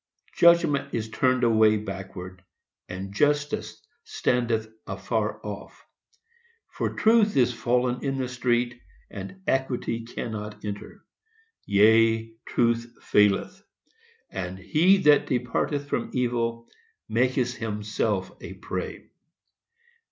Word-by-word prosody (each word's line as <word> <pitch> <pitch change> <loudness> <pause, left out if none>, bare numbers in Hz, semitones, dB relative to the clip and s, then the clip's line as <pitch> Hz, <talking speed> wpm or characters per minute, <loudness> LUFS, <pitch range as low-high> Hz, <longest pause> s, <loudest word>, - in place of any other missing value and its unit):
Judgment 170 -4 +4
is 110 -1 -3
turned 125 +2 +2
away 110 -2 +5
backward, 95 -3 -7 0.5
And 95 +2 -6
Justice 145 +4 0 0.2
standeth 115 -3 0 0.2
afar 105 +2 -2
off; 105 -1 -8 0.9
For - - -3
Truth 220 -3 +4
is 125 -1 +4
fallen 125 +2 0
in 135 -1 -1
the 130 -1 -1
street, 120 -1 -1 0.3
And 100 - -8
Equity 125 -3 -1
cannot 105 -3 -6
enter. 105 0 -7 0.6
Yea, 110 +2 +4
Truth 120 0 0
faileth; 105 - +2 0.7
And 90 0 -5
HE 165 - +4
THAT 150 -1 +5
DEPARTETH 130 +3 -1
FROM 125 - -2
EVIL 115 -2 -1 0.4
MAKETH 125 +1 +1
HIMSELF 105 -2 -2
A - - -8
PREY. - - -6
115 Hz, 100 wpm, -26 LUFS, 105-130 Hz, 0.9 s, away